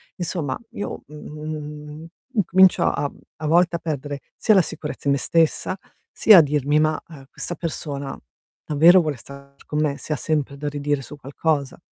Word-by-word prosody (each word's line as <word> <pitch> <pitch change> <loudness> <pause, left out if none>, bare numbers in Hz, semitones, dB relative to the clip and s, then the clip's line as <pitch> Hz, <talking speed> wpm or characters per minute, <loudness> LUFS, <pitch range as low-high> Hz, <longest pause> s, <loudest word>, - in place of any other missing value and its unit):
Insomma 165 -6 -3
io, 205 - -6
mhmm, 150 0 -8 0.3
incomincio 190 -2 +5
a 145 - 0 0.3
a 155 - -6
volte 175 +2 +3
a - - -2
perdere 145 -3 -4
sia 215 - +3
la 190 - +7
sicurezza 150 -2 -6
in - - +4
me 140 - 0
stessa, 165 +3 +1 0.3
sia 210 -5 +7
a - - +9
dirmi: 145 0 +1
"Ma, 155 0 +2
ehm, 140 -4 -12
questa 175 - -5
persona 145 -4 -5 0.5
davvero 165 +5 +6
vuole 150 -5 -2
stare 140 +3 -13
con 150 0 -1
me, 145 -2 0
se 155 - -4
ha - - 0
sempre 145 -2 -2
da 145 +1 -4
ridire 145 -1 -1
su 150 - -10
qualcosa?". 140 +1 -2
150 Hz, 170 wpm, -22 LUFS, 145-165 Hz, 0.5 s, a